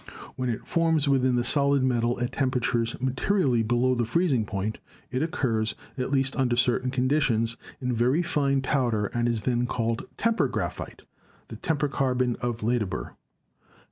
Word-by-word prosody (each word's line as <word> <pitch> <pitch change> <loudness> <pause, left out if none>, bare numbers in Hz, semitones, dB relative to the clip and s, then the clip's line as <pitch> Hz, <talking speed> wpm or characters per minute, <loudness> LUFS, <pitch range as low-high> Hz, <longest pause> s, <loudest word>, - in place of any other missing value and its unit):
When 125 -1 -2
it 115 - -3
forms 160 -3 +2
within 130 -2 +3
the 120 - +1
solid 140 0 +3
metal 120 -1 +1
at 120 - -1
temperatures 125 -3 0
materially 130 - +1
below 120 +3 +2
the 120 -1 0
freezing 130 -2 +1
point, 100 +3 -3 0.3
it 130 +1 -1
occurs, 120 -9 -1 0.2
at 130 -1 -2
least 135 -1 +2
under 130 -3 +1
certain 125 +1 +2
conditions, 125 -3 +1 0.2
in 125 -1 -1
very 125 +8 +2
fine 140 -4 +1
powder 120 -7 0
and 120 0 +1
is 115 -2 -1
then 120 +2 0
called 115 +8 -2
"temper" 230 0 +2
graphite, - - -5 0.5
the - - -7
temper 150 -3 0
carbon 130 -3 0
of 120 -2 -3
Ledebur. 115 -4 -1
125 Hz, 155 wpm, -26 LUFS, 120-140 Hz, 0.5 s, within